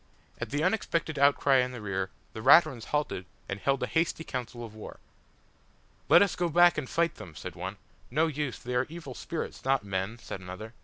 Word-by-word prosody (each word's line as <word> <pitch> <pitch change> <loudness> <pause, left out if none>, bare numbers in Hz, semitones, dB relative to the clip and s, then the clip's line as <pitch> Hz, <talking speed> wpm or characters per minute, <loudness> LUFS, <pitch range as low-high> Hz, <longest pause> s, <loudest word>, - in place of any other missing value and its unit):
At - - -4
the 145 +2 -1
unexpected 165 -8 0
outcry 140 -1 +5
in 125 0 +1
the 125 - -6
rear 95 -3 -2 0.2
the 110 - -6
Raturans 130 -2 +6
halted, 145 -11 -2 0.2
and 100 - -4
held 135 +4 +1
a - - +3
hasty 165 0 0
council 120 -4 -5
of 110 - -11
war. 110 - -10 1.1
"Let - - +8
us 200 - -1
go 175 -1 0
back 175 +2 +6
and 130 - -6
fight 170 -1 +1
them," 85 -4 -10
said 90 +2 -7
one. 95 +4 -6 0.3
"No 155 +6 +2
use, 150 -4 -2
they 125 - -6
are 125 +1 +1
evil 165 +1 -8
spirits 165 - -5
not 135 -3 +2
men," 95 +3 -2
said 105 - -7
another. 95 +5 -8
130 Hz, 200 wpm, -29 LUFS, 105-155 Hz, 1.1 s, Let